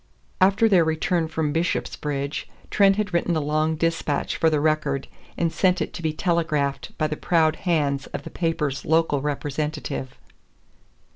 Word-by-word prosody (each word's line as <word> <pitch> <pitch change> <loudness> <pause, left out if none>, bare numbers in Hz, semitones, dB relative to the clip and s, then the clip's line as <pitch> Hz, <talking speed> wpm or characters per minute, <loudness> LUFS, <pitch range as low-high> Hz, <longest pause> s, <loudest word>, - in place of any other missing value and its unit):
After 200 +4 +5
their 190 -6 +5
return 160 +1 0
from 155 -2 -1
Bishopsbridge, 150 -3 -2 0.3
Trent 195 -1 +5
had 205 -3 -2
written 170 0 +1
a - - +2
long 155 +2 0
dispatch 165 -2 -1
for 165 - +3
the 155 -2 +1
Record, 150 -3 0 0.3
and 165 -1 0
sent 185 -1 +2
it - - -3
to - - -7
be 160 -1 0
telegraphed 155 -5 -1
by 155 - +1
the 155 - -1
proud 160 -1 +2
hands 145 -4 +1
of - - -6
the - - -8
paper's 160 -5 -1
local 160 -3 +2
representative. 145 -2 -3
155 Hz, 155 wpm, -24 LUFS, 145-170 Hz, 0.3 s, After